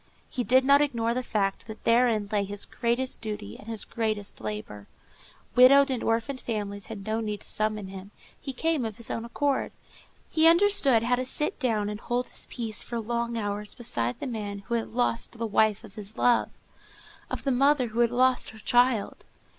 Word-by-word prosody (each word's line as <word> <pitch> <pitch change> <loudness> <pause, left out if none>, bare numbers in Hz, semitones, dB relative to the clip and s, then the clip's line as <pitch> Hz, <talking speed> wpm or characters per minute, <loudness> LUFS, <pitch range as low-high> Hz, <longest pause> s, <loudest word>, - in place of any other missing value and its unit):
He 250 - -2
did 260 +2 +4
not 280 +1 +6
ignore 235 -5 0
the 255 - -1
fact 205 -3 -1
that 220 -1 -9
therein 230 -3 +3
lay 205 -1 +1
his 200 +1 -4
greatest 245 +2 -1
duty 210 - -5
and 210 - -14
his 225 -2 -3
greatest 215 -3 -3
labor. 105 -1 -6 0.7
Widowed 275 +3 +7
and 255 - -1
orphaned 230 +4 -1
families 205 -3 -4
had 205 -3 -8
no 220 +1 -1
need 210 -2 -3
to - - -10
summon 215 -2 -2
him; 190 0 -9 0.3
he 275 - -5
came 315 +1 0
of 220 -2 -4
his 235 - -2
own 230 - -3
accord. 280 +3 -1 0.6
He 320 0 +4
understood 335 - +4
how 245 +1 +2
to 255 - -2
sit 300 +3 -1
down 220 -6 +1
and 210 0 -4
hold 245 +2 -1
his - - -3
peace 225 -3 -2
for 235 - -4
long 235 +1 -2
hours 205 -1 -3
beside 120 - -2
the - - -4
man 205 -5 -5
who 235 - -4
had 230 -1 0
lost 235 0 -1
the 230 - -2
wife 215 0 +2
of 210 -4 -13
his 210 0 -6
love, 240 -1 +3 0.8
of - - -5
the 275 - +1
mother 270 -1 +3
who 225 +2 -4
had 235 -1 +4
lost 255 +1 +2
her 220 - -12
child. 240 -1 +2
230 Hz, 195 wpm, -27 LUFS, 210-250 Hz, 0.8 s, Widowed